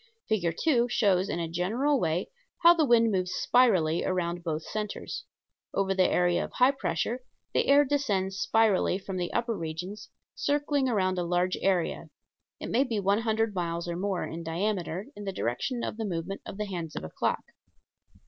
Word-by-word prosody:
Fig. 175 -7 0
2 245 -7 +3
shows 200 -6 +2
in - - -1
a 165 - -2
general 225 - +1
way 170 0 -1 0.3
how 340 +1 +9
the 320 -4 +2
wind 230 -2 +5
moves 185 -2 -1
spirally 185 -10 +3
around 175 -2 -1
both 160 -2 -2
centers. 215 - -5 0.5
Over 195 -1 +1
the 185 -1 +3
area 175 -1 +2
of - - -8
high 250 +2 +5
pressure 255 -2 -2 0.3
the - - +2
air 285 +1 +6
descends 205 -10 0
spirally 215 -5 +3
from 195 -1 -6
the 175 -1 -2
upper 235 -1 0
regions, 175 +4 -6 0.2
circling 285 -2 0
around 185 -5 +1
a - - 0
large 175 +1 +1
area 185 -3 0 0.5
it - - -5
may 255 - +4
be 235 -6 -2
one 200 +2 +2
hundred 225 -1 0
miles 170 -2 -2
or 170 - -2
more 190 0 -1
in 165 +1 -6
diameter 180 +2 -2
in 205 - -8
the 195 - -2
direction 190 - -2
of - - -4
the 225 - -2
movement 180 +1 -4
of - - -7
the 210 - -2
hands 170 -6 -5
of - - -4
a 80 - -6
clock. - - -1
195 Hz, 185 wpm, -28 LUFS, 175-230 Hz, 0.5 s, how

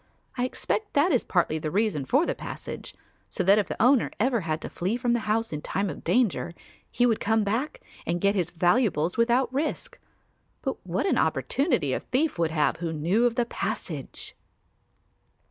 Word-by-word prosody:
I 245 - 0
expect 415 +10 -2
that 295 +6 +4
is 255 - +2
partly 165 -3 +1
the 155 - -3
reason 195 -6 0
for 275 - +3
the - - 0
passage; - - -7 0.3
so 190 - -1
that 200 +3 +6
if 205 - 0
the - - -5
owner 250 +1 +4
ever 235 0 +2
had 160 -2 -2
to - - -5
flee 190 +7 -1
from 245 -1 +1
the 240 - +2
house 225 -3 0
in 150 - -3
time 195 +3 -1
of - - -10
danger, 215 -8 +1 0.3
he 245 - +2
would 230 -3 +2
come 220 +1 +2
back 230 +9 -2 0.2
and 175 +1 -1
get 200 +2 +3
his 180 -4 0
valuables 175 - +2
without 240 +2 +2
risk; 295 +4 -2 0.6
but - - -3
what - - -1
an - - +2
opportunity 250 - +1
a - - 0
thief 275 - -1
would 165 -1 +2
have 155 -2 +1
who 165 -1 -3
knew 170 +10 +1
of 235 - -2
the 240 - +1
passage!" - - -4
215 Hz, 190 wpm, -26 LUFS, 175-250 Hz, 0.6 s, that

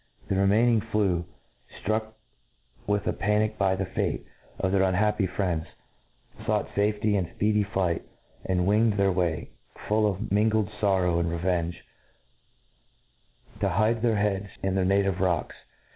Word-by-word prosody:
The 95 - +1
remaining 110 +4 +3
few, 100 -6 0 0.6
ftruck 110 +2 -1 0.7
with 105 0 0
a - - 0
panic 105 +2 0
by 95 -1 +2
the - - -2
fate - - -2 0.3
of 95 - 0
their 100 0 +3
^ 95 - +3
unhappy 105 +1 +1
friends, 85 -4 -2 0.8
fought - - 0
lafety 105 +1 +1
in 95 -4 0
^edy 105 0 +3
flight, 95 -4 -1 0.4
and 90 -1 0
winged 105 +3 +3
their 100 -1 +2
W?iy, 85 -3 -1 0.4
full 105 0 +3
of 100 +2 -3
mingled 105 0 +2
forrow 95 -4 +2
and 85 -1 0
revenge, 85 -1 -2 1.7
to - - +1
hide 110 +2 +1
their 115 -2 +2
heads 100 -1 0 0.2
in 95 -1 0
their 95 -1 +1
native 100 -1 +2
rocks. 90 -4 0
100 Hz, 145 wpm, -27 LUFS, 95-105 Hz, 1.7 s, remaining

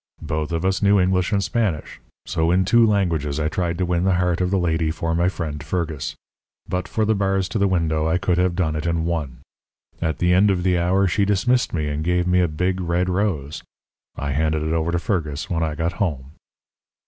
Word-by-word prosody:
Both 75 +1 -3
of 85 +1 -1
us 95 0 +1
knew 100 0 +4
English 90 -1 +1
and 100 -1 +1
Spanish; 105 -7 -2 0.3
so 80 +1 0
in 90 +2 +3
two 120 +5 +5
languages 80 -8 0
I 75 0 0
tried 85 -1 -2
to 90 - 0
win 90 0 0
the 95 -1 +2
heart 90 0 +1
of 90 - +1
the 95 - +1
lady 80 -3 0
for 80 +1 -2
my 85 +2 +2
friend 80 -5 -5
Fergus. 80 -3 -3 0.5
But 90 0 -2
for 110 - 0
the 110 - +2
bars 95 -2 0
to 110 - -2
the 100 - +3
window 80 -4 0
I 80 +2 +2
could 90 -1 0
have 90 -1 +1
done 80 -4 0
it 75 +2 -3
in 85 -1 0
one. 75 -7 -3 0.6
At 80 -2 -1
the 90 0 +2
end 100 +3 +5
of 90 -2 0
the 90 -1 +2
hour 95 +3 +2
she 100 +3 +1
dismissed 105 +6 +1
me 80 -3 -1
and 75 +1 -2
gave 90 +1 +1
me 90 0 +3
a 90 - +3
big, 90 +4 -1
red 90 +1 0
rose. 90 -7 -1 0.5
I 70 0 -3
handed 75 +2 0
it 80 +1 -1
over 80 +1 0
to 85 - 0
Fergus 80 -5 -2
when 85 -1 0
I 80 -2 -1
got 85 +2 -1
home. 75 -9 -3
85 Hz, 225 wpm, -22 LUFS, 80-95 Hz, 0.6 s, two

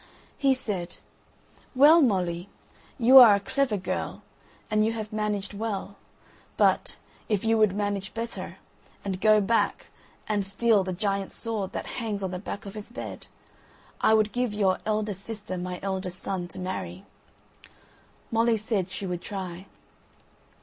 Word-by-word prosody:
He 270 -1 +4
said: 190 -8 -3 0.8
"Well, 300 +6 +7
Molly, 185 - 0 0.5
you 260 +1 +9
are 225 -5 +9
a - - 0
clever 250 +1 0
girl, 185 - -4 0.5
and 215 0 +3
you 225 +1 +1
have 215 -1 -6
managed 210 -1 -2
well; 200 -2 -4 0.6
but, - - +3 0.3
if 210 -1 0
you 225 0 +3
would 210 -3 +4
manage 205 -1 -2
better, 230 0 -5 0.5
and 190 -1 -3
go 215 0 +6
back, 225 +3 0 0.4
and 210 -2 0
steal 205 +1 +2
the 185 - -3
giant's 195 +1 -2
sword 220 -5 -2
that - - -4 0.2
hangs 210 -3 -2
on 190 - -2
the 180 - -4
back 205 +2 -6
of 200 - -7
his 210 +2 -8
bed, - - -7 0.7
I 220 - +5
would 215 -1 +2
give 245 -4 -1
your 190 -3 +2
eldest 210 -2 -1
sister 210 -4 -4
my 180 0 -4
eldest 190 -2 -3
son 185 -3 -3
to 175 - -9
marry." 95 - -5 1.3
Molly 230 0 +3
said 205 -4 -1
she 195 - -5
would 180 -2 -3
try. 190 -2 -6
205 Hz, 150 wpm, -27 LUFS, 190-225 Hz, 1.3 s, you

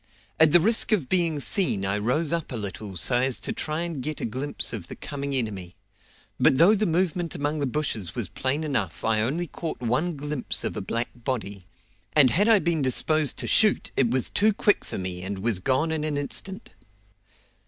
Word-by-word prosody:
At 160 -1 +6
the 175 - +7
risk 220 +8 +2
of 175 -12 +1
being 170 -5 +1
seen 140 - +1
I 95 +1 0
rose 145 +9 0
up 165 -3 -3
a - - -4
little 100 -2 -6
so 120 +8 +3
as 130 -1 +1
to - - -3
try 155 +1 -3
and 170 -5 -4
get 155 +3 -4
a - - -3
glimpse 130 +6 0
of 100 -7 -6
the - - -8
coming 140 -1 -5
enemy; 100 -8 -3 0.6
but 130 - +4
though 175 +8 +6
the 215 0 +1
movement 175 -1 -1
among 145 +2 -2
the 140 - 0
bushes 115 - -2
was 115 -6 -2
plain 135 - -1
enough 95 - -2
I 110 -1 +2
only 150 +10 -1
caught 165 0 -6
one 130 +9 -1
glimpse 145 -2 -3
of - - -3
a - - -3
black 115 +1 -2
body, 110 -7 -5 0.5
and 140 -5 +6
had 205 +6 +2
I 225 -2 +6
been 170 -4 0
disposed 150 +3 +1
to - - -1
shoot 215 -2 +3
it 125 -4 +2
was 130 +1 +1
too 215 +1 +3
quick 205 0 +2
for - - -6
me 90 -1 -4
and 95 +2 -4
was 105 -1 +1
gone 130 - 0
in 155 -1 -2
an 155 -2 -2
instant. 190 +8 -4
140 Hz, 205 wpm, -25 LUFS, 115-165 Hz, 0.6 s, the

